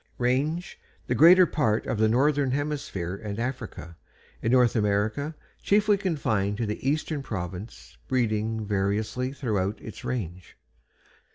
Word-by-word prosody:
RANGE 140 +8 -1 0.3
The - - 0
greater 180 +4 +8
part 115 -10 0
of 110 - -2
the 110 - +4
northern 140 +3 +2
hemisphere 135 - -2
and 105 -1 -6
Africa. 120 - -5 0.4
In 115 - 0
North 125 -2 +4
America 110 +8 0 0.3
chiefly 210 +1 +3
confined 110 - -1
to 115 - -1
the 105 +5 -2
eastern 150 0 -1
province, 95 -3 -7
breeding 110 -3 0
variously 105 +5 -1
throughout 105 -7 -2
its 110 - -10
range. 90 -7 -5
115 Hz, 125 wpm, -26 LUFS, 105-145 Hz, 0.4 s, greater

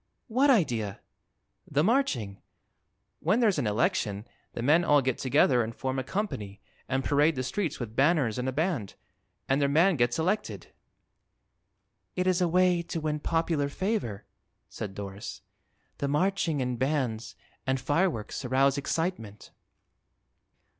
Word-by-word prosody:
"What 260 +6 +3
idea?" 120 - +1 0.7
"The 145 +1 +2
marching. 160 - 0 0.8
When 185 +9 +2
there's 210 -9 +3
an 120 - 0
election 105 - 0 0.3
the 115 - -4
men 155 +6 +4
all 145 -3 +5
get 130 -2 -1
together 125 -1 +3
and 115 0 -4
form 130 0 -2
a - - -2
company 110 - -4 0.3
and 135 0 0
parade 145 +3 +3
the 130 - -2
streets 165 - -2
with 115 -3 -6
banners 135 -5 +2
and 125 +1 -1
a - - -1
band 145 - -2 0.5
and 135 +2 +2
their 140 - +2
man 165 +4 +4
gets 120 -1 +1
elected." 190 +6 -2 1.4
"It 180 - 0
is 185 0 +2
a 180 - +3
way 180 0 +3
to 170 -1 -4
win 150 -1 -2
popular 165 -2 0
favor," 185 - -2 0.4
said 95 -2 -6
Doris. 100 0 -7 0.6
"The 140 - -1
marching 160 -1 +1
and 125 -2 -3
bands 130 -5 -1 0.3
and 130 0 +1
fireworks 145 - -1
arouse 135 +2 +2
excitement." 140 - -3
145 Hz, 140 wpm, -28 LUFS, 120-175 Hz, 1.4 s, all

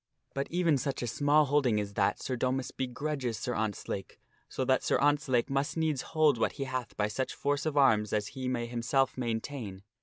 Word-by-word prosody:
But 135 0 -2
even 170 -5 +2
such 135 -1 -2
a - - 0
small 145 +5 +3
holding 135 -6 +2
as 100 -1 -4
that 100 -1 +1
Sir 130 - -3
Domas 130 +1 -1
begrudges 130 -2 -2
Sir 125 - -3
Ontzlake, 105 -3 -3 0.3
so 130 - -2
that 130 0 +3
Sir - - +2
Ontzlake 145 -4 +2
must 135 +3 -1
needs 155 -5 +1
hold 155 -6 +2
what - - +1
he 140 - -4
hath 130 -2 -4
by 105 - +2
such 130 +5 -3
force 145 +2 0
of 150 -2 -2
arms 110 -7 +4
as 105 -1 0
he 130 -1 -5
may 120 -2 -1
himself 120 +3 0
maintain. 115 -4 -4
130 Hz, 200 wpm, -30 LUFS, 115-145 Hz, 0.3 s, arms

